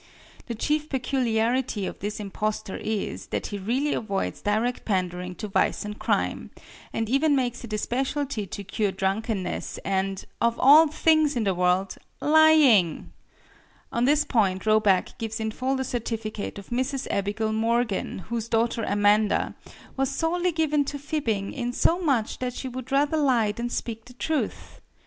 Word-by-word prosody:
The 235 - -4
chief 300 +6 -1
peculiarity 245 -4 0
of - - -6
this 205 +2 -4
impostor 210 0 -3
is, 215 -2 -3
that - - -3
he 205 - -4
really 255 +9 0
avoids 200 -3 -2
direct 220 +4 0
pandering 180 -2 -2
to 210 - -5
vice 200 - 0
and 210 0 -6
crime, 215 -2 -1 0.4
and 225 - -2
even 280 +5 +3
makes 250 -2 -1
it 235 - -8
a - - +1
specialty 260 -1 -2
to 200 - -6
cure 200 +1 -1
drunkenness 195 +1 -2
and 195 0 -1 0.2
of 235 0 +1
all 300 +4 +8
things 310 -1 +3
in 235 - 0
the 195 -2 +1
world 180 +2 +1 0.2
lying! 300 - +5 0.8
On 235 +1 +1
this 295 +2 +3
point 195 -5 +1
Roback 215 -3 +3
gives 225 0 -4
in 220 0 -2
full 260 +4 -1
the 265 - -1
certificate 225 -4 -4
of 200 - -10
Mrs. 260 +2 -1
Abigail 205 +2 -1
Morgan, 225 -4 0
whose 230 -1 -2
daughter 230 0 +1
Amanda 205 +1 +2 0.4
"was 270 -1 +1
sorely 345 +5 0
given 305 -3 +1
to 285 - -4
fibbing, 270 -9 -2
in 245 -3 -2
so 340 +7 +2
much 265 -10 0
that 250 -1 -3
she 265 - -5
would 255 +1 -7
rather 290 +3 +2
lie 250 -8 +3
than 235 +3 -4
speak 225 -2 -4
the 250 - -14
truth." 310 +4 -3
230 Hz, 160 wpm, -26 LUFS, 205-270 Hz, 0.8 s, all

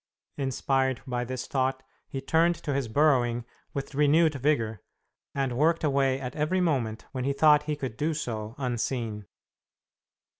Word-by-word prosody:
Inspired 135 -1 0
by 125 -2 -2
this 130 0 -4
thought, 130 0 -1 0.3
he 135 - -4
turned 165 +5 +3
to 145 - -4
his 135 -3 -1
burrowing 120 -3 +2 0.3
with 140 +1 -5
renewed 150 +3 +4
vigor, 120 -7 0 0.5
and 135 -3 -1
worked 165 +5 +2
away 135 -2 +2
at 125 -1 -6
every 155 +5 +1
moment 130 -11 0
when 130 -2 -3
he 140 +2 +1
thought 150 0 +5
he 150 - +1
could 130 -6 -5
do 155 +1 0
so 110 -5 -4
unseen. 120 -5 -2
135 Hz, 150 wpm, -27 LUFS, 125-150 Hz, 0.5 s, thought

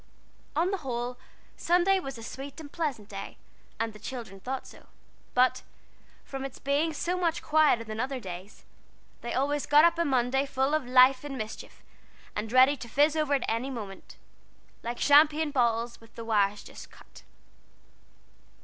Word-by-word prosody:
On 340 +5 +2
the 395 - 0
whole, 245 -3 -4 0.4
Sunday 360 +3 +3
was 270 -7 -7
a 230 - -9
sweet 270 +6 -8
and 295 -3 -10
pleasant 280 -11 -3
day, 195 -2 -8 0.4
and 225 -1 -2
the 210 - -13
children 220 -4 -7
thought 255 +6 -4
so; - - -15 0.5
but, 255 +1 +3 0.6
from 270 -1 -6
its 270 -1 -6
being 285 +4 0
so 350 +4 -2
much 340 -2 0
quieter 300 -6 +3
than 220 -1 -6
other 260 +2 -2
days, 185 -1 -9 0.6
they 235 - -4
always 285 +2 0
got 295 +2 +7
up 340 0 +2
on 335 - +2
Monday 265 +1 +1
full 270 +2 0
of 310 -5 0
life 255 +1 +6
and 280 -2 -5
mischief, 220 -2 -8 0.5
and 215 +1 -3
ready 260 +3 +6
to 240 -3 -9
fizz 295 +5 +3
over 305 -2 +1
at 270 - -1
any 230 +4 -1
minute, 210 -7 -8 0.7
like 235 +1 -5
champagne 300 +1 +5
bottles 235 -2 0
with 225 0 -19
the 230 - -7
wires 205 -2 +1
just - - -12
cut. - - -17
265 Hz, 165 wpm, -28 LUFS, 230-295 Hz, 0.7 s, got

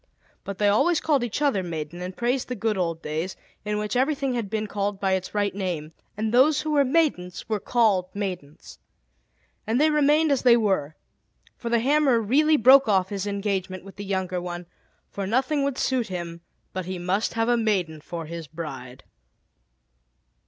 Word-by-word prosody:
But 200 -1 -6
they 205 - +2
always 305 +12 +3
called 290 -5 +1
each 240 +5 -2
other 270 -10 +2
"maiden," 170 -1 -5
and 180 +1 -6
praised 245 +2 0
the 250 - -4
good 220 0 -1
old 165 -3 -2
days 160 +5 -3 0.3
in 210 0 -2
which 210 +3 -3
everything 270 0 +1
had 230 -5 -3
been 215 0 -2
called 200 -1 -3
by 195 -1 0
its 190 +2 -2
right 205 -1 +1
name, 175 -6 -3 0.3
and 220 +1 -1
those 275 +4 +5
who 310 - -3
were 290 -2 +4
maidens 260 - 0
were 215 -2 -1
called 210 -6 +2
maidens. 180 -7 -6 0.9
And 225 +3 +1
they 310 +1 +4
remained 300 +1 +3
as 275 - +2
they 240 -2 +6
were; 190 -9 0 0.6
for 235 - -5
the 235 - +3
hammer 275 -2 +3
really 300 +8 +3
broke 265 +2 +7
off 190 -3 +2
his 200 0 -3
engagement 195 -2 -2
with 195 0 -13
the 205 - -6
younger 190 -2 -2
one, 175 0 -6 0.5
for 195 -1 -4
nothing 265 +7 +1
would 280 -2 -1
suit 255 -3 0
him 170 -2 -6 0.3
but 185 -1 -4
he 185 0 -4
must 185 +6 -1
have 225 0 +1
a 240 - +4
maiden 190 -9 0
for 165 +1 -6
his 165 0 -7
bride. 135 -6 -8
205 Hz, 185 wpm, -25 LUFS, 180-250 Hz, 0.9 s, broke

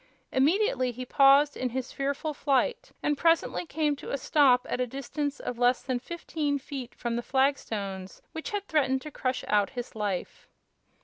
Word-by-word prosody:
Immediately 300 - +2
he 255 +2 -6
paused 275 +3 +5
in 255 - -2
his 255 +1 -4
fearful 280 +3 -2
flight 275 -3 0
and 295 - +2
presently 330 +2 +2
came 300 -1 0
to - - -9
a 280 - -1
stop 265 -2 +4
at - - -1
a 250 - 0
distance 275 +3 -4
of 245 -1 -5
less 245 +1 +3
than 255 -2 -1
fifteen 300 0 -2
feet 270 -3 -7
from 235 -1 -3
the - - -1
flagstones 215 -8 -1
which 320 - -5
had 410 -1 -3
threatened 265 -4 +1
to 305 - -7
crush 255 -2 -2
out 205 -1 +3
his 245 -1 -5
life. 205 -4 -3
270 Hz, 175 wpm, -28 LUFS, 245-295 Hz, -, paused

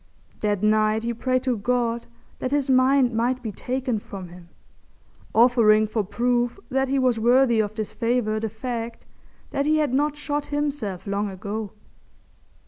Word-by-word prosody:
That 205 -2 -1
night 215 +1 +3
he 235 0 -1
prayed 255 +2 0
to 255 -2 +1
God 235 +1 -1 0.3
that 255 - -2
his 280 -1 +1
mind 255 -1 +4
might 245 +3 0
be 220 - -3
taken 250 +2 -2
from 190 -3 -9
him, 175 0 -14 0.9
offering 225 -2 +5
for 215 0 -1
proof 240 - 0
that 265 +1 +1
he 275 - +1
was 255 -3 +2
worthy 240 0 +4
of 215 0 -1
this 215 -2 -4
favour 230 -2 0
the 220 0 -2
fact 230 +1 -5 0.5
that 280 +1 -1
he 310 0 +3
had 300 -4 +1
not 295 +2 +1
shot 295 0 -3
himself 290 -11 -3
long 200 +1 -1
ago. 200 +2 -5
235 Hz, 160 wpm, -24 LUFS, 215-260 Hz, 0.9 s, offering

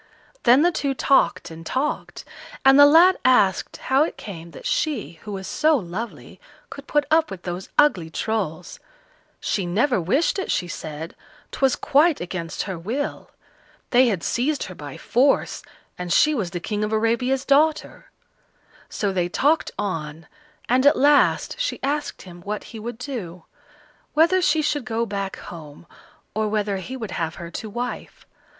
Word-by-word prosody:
Then 255 +5 +6
the 350 - +4
two 280 -4 -2
talked 270 -9 +2
and 165 0 -10
talked, 265 - -3 0.4
and 270 +1 +7
the 285 - +10
lad 340 +5 +6
asked 205 -8 +3
how 265 +1 +1
it 315 - 0
came 170 -5 -9
that - - -12
she, 290 - -2
who 210 - -8
was 190 -1 -5
so 310 +7 +2
lovely, 210 +3 -7 0.3
could 280 0 -10
put 295 -1 +1
up 320 0 +4
with 185 -2 -8
those 180 +1 -5
ugly 190 - +3
Trolls. 180 -3 -3 0.6
She 195 -4 -2
never 220 +4 +1
wished 275 - +1
it, 380 - -4
she 180 -1 0
said; 155 0 -7 0.4
'twas 270 -2 +2
quite 300 +2 +3
against 175 -2 -4
her 190 -4 -5
will. 245 - -4 0.6
They 255 +1 +5
had 195 -7 -1
seized 275 +4 0
her 185 - -7
by 145 -5 -9
force, 265 +4 +1 0.4
and 180 -1 -4
she 305 - +4
was 210 -11 -2
the 175 0 -5
King 210 +4 -3
of 210 - -2
Arabia's 235 +4 +1
daughter. 300 +3 +1 0.8
So 200 -2 -2
they 175 -2 0
talked 295 - +2
on, 165 -5 -4 0.4
and 255 +2 +3
at 290 - +5
last 290 - +3
she - - -2
asked 290 +2 -2
him 175 -2 -12
what 210 +3 -4
he 225 - -7
would 230 +1 -6
do; 200 - -7 0.7
whether 340 +4 +4
she 310 -2 +2
should 290 -2 0
go 230 0 -1
back 200 -2 -4
home, 155 -2 -11 0.5
or 215 0 0
whether 210 -2 -1
he 255 +8 -6
would 220 -6 -6
have 165 -2 -3
her 170 0 -8
to 215 - -6
wife. 245 +3 -6
225 Hz, 165 wpm, -23 LUFS, 180-285 Hz, 0.8 s, the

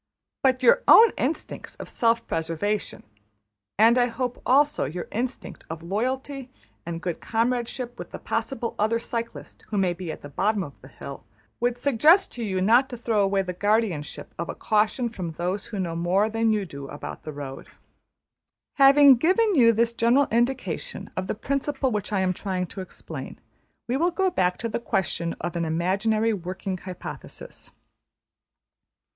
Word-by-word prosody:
But 260 -1 +2
your 255 - +6
own 455 0 +9
instincts 300 +5 -3
of - - -9
self 230 0 +1
preservation, 165 +6 -2 0.7
and 230 +4 +6
I 245 - +4
hope 250 +1 -4
also 290 - +3
your 170 +6 -5
instinct 250 +3 -4
of 160 0 -6
loyalty 260 +7 -3 0.4
and 165 -1 -3
good 175 -3 -3
comradeship 240 +1 -2
with - - -7
the - - -7
possible 240 -4 -3
other 220 +2 +2
cyclist 230 0 -6
who 210 - -3
may 185 -2 +2
be 175 -2 -6
at - - -9
the - - -7
bottom 200 +7 0
of 140 - -9
the 135 - -13
hill, 140 0 -9 0.4
would 245 0 0
suggest 295 - +4
to 240 - -5
you 190 -3 -1
not 240 +7 +4
to 245 - -6
throw 225 -3 +1
away 195 0 +2
the 180 -1 -4
guardianship 205 -5 -1
of 170 - -3
a - - -4
caution 220 +3 +1
from 185 -8 -5
those 180 +5 -3
who 215 - -6
know 170 -3 -2
more 185 +6 +1
than 225 0 +2
you 210 -2 0
do 140 -4 -8
about 145 - -8
the 155 - -7
road. 140 -2 -8 1.1
Having 275 -1 +8
given 395 - +3
you 240 -8 +6
this 230 +1 +1
general 235 +5 +3
indication 260 - -1
of 185 0 -3
the - - -2
principle 275 +3 -1
which 210 -1 -3
I 200 -2 +1
am 185 -1 +1
trying 185 -1 -3
to 190 - -8
explain, 185 - -8 0.5
we 250 +2 0
will 340 +4 +2
go 375 +1 0
back 180 - +1
to 230 - -3
the 225 - -2
question 175 -6 -1
of 175 - -4
an 170 - 0
imaginary 200 +7 +1
working 185 0 -4
hypothesis. 180 -1 -9
220 Hz, 170 wpm, -25 LUFS, 185-250 Hz, 1.1 s, own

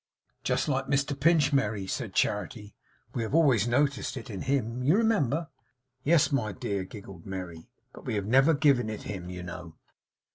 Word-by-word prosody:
'Just - - 0
like 135 -2 0
Mr 140 +1 +1
Pinch, 145 0 +3
Merry!' 105 -7 +1
said 115 +2 -4
Charity. 105 0 -1 0.4
'We 120 - -2
have 115 +6 -2
always 130 -9 +4
noticed 140 +2 0
it 115 -2 -7
in 95 - -5
him, 125 -3 -1
you 145 +8 +4
remember?' 165 - +1 0.5
'Yes, 160 0 +4
my 120 -7 0
dear,' 100 0 -3
giggled 95 -3 -11
Merry, 90 -4 -7 0.2
'but - - -12
we - - -1
have 100 -2 -1
never 135 +8 +4
given 140 -6 +3
it 110 - -6
him, 90 -3 -6
you 90 -1 -6
know. 90 -2 -8
120 Hz, 175 wpm, -28 LUFS, 100-140 Hz, 0.5 s, always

